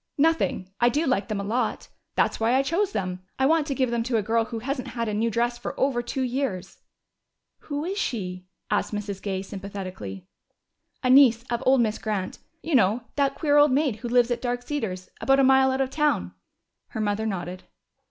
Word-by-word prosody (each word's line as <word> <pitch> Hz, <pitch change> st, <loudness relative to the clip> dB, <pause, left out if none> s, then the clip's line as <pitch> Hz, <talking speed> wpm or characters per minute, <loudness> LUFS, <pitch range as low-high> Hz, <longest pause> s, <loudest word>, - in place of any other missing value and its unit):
"Nothing. 315 Hz, -, +1 dB
I 240 Hz, -, +5 dB
do 295 Hz, +7 st, 0 dB
like 250 Hz, -7 st, +1 dB
them 215 Hz, -3 st, -2 dB
a -, -, -3 dB
lot. 225 Hz, +3 st, -1 dB, 0.3 s
That's -, -, +1 dB
why 230 Hz, +3 st, +2 dB
I 270 Hz, -, +3 dB
chose 365 Hz, +8 st, 0 dB
them. 185 Hz, -, -3 dB, 0.2 s
I 265 Hz, -, +2 dB
want 310 Hz, +1 st, +3 dB
to 275 Hz, -, -2 dB
give 255 Hz, -2 st, +1 dB
them 235 Hz, -1 st, 0 dB
to 240 Hz, -2 st, +1 dB
a 215 Hz, -, 0 dB
girl 225 Hz, +2 st, +1 dB
who 230 Hz, -, -6 dB
hasn't 260 Hz, +3 st, -3 dB
had 235 Hz, -1 st, -3 dB
a 215 Hz, -, -2 dB
new 225 Hz, +3 st, +1 dB
dress 240 Hz, +1 st, 0 dB
for 240 Hz, -, -6 dB
over 265 Hz, -3 st, +2 dB
two 260 Hz, +2 st, -3 dB
years." 250 Hz, -7 st, -3 dB, 0.8 s
"Who 290 Hz, +1 st, -4 dB
is 390 Hz, +3 st, -2 dB
she?" 185 Hz, -, -3 dB, 0.2 s
asked -, -, 0 dB
Mrs. 205 Hz, -2 st, -4 dB
Gay 190 Hz, -2 st, -3 dB
sympathetically. 185 Hz, -, -7 dB, 0.8 s
"A 255 Hz, -, +3 dB
niece 250 Hz, -4 st, +6 dB
of 235 Hz, 0 st, 0 dB
old 260 Hz, -1 st, +5 dB
Miss 220 Hz, -2 st, 0 dB
Grant. 205 Hz, -4 st, -3 dB, 0.2 s
You 325 Hz, -, -3 dB
know 225 Hz, -1 st, +3 dB
that 275 Hz, -1 st, +1 dB
queer 295 Hz, -2 st, +2 dB
old 290 Hz, -1 st, +6 dB
maid 275 Hz, -5 st, +1 dB
who 240 Hz, -, -6 dB
lives 245 Hz, 0 st, +3 dB
at 240 Hz, -, -1 dB
Dark 245 Hz, -1 st, -2 dB
Cedars. 220 Hz, -10 st, -4 dB
About 270 Hz, 0 st, +4 dB
a -, -, +5 dB
mile 265 Hz, 0 st, +5 dB
out 265 Hz, +1 st, 0 dB
of 265 Hz, 0 st, -1 dB
town." 270 Hz, -, 0 dB, 0.5 s
Her -, -, -6 dB
mother 215 Hz, +1 st, 0 dB
nodded. 180 Hz, -2 st, -5 dB
240 Hz, 210 wpm, -25 LUFS, 205-270 Hz, 0.8 s, niece